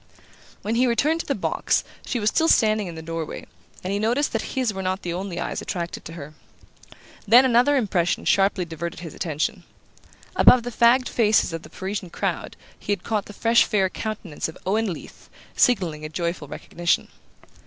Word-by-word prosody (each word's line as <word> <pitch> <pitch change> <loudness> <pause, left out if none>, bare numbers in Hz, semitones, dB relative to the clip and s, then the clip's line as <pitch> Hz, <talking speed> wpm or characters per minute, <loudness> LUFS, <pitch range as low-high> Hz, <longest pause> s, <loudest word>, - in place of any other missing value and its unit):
When 215 - -1
he 250 +2 +3
returned 295 +7 +2
to - - -5
the - - 0
box - - 0 0.2
she 245 - -1
was 210 0 +2
still 325 - +2
standing 215 - +3
in 170 - -7
the 160 - -8
doorway, 165 -1 -5 0.4
and 185 +2 -2
he 200 - 0
noticed 240 +7 +1
that 225 - 0 0.2
his 250 -5 +1
were 190 - -4
not 185 +1 -2
the 175 - -3
only 180 -1 -4
eyes - - -3
attracted 170 -1 -5
to 165 - -8
her. 155 -2 -9 0.9
Then 245 +5 +8
another 250 +3 +4
impression 185 -8 0
sharply 195 -2 +2
diverted 170 +1 -6
his 165 -3 -8
attention. 175 +5 -2 0.7
Above 250 -2 +7
the 245 - -4
fagged 240 +3 +4
faces 215 -6 +2
of 165 - -4
the - - -13
Parisian 190 -1 -5
crowd - - -3 0.2
he - - -4
had 205 - -1
caught 215 -3 -1
the - - -9
fresh 230 +3 +4
fair 195 -3 +1
countenance 215 -8 -4
of 160 - -11
Owen 210 +2 +1
Leath 165 - -10 0.3
signalling 175 - +2
a 155 - -5
joyful 170 -1 -3
recognition. 175 +4 -1
200 Hz, 185 wpm, -24 LUFS, 170-230 Hz, 0.9 s, Then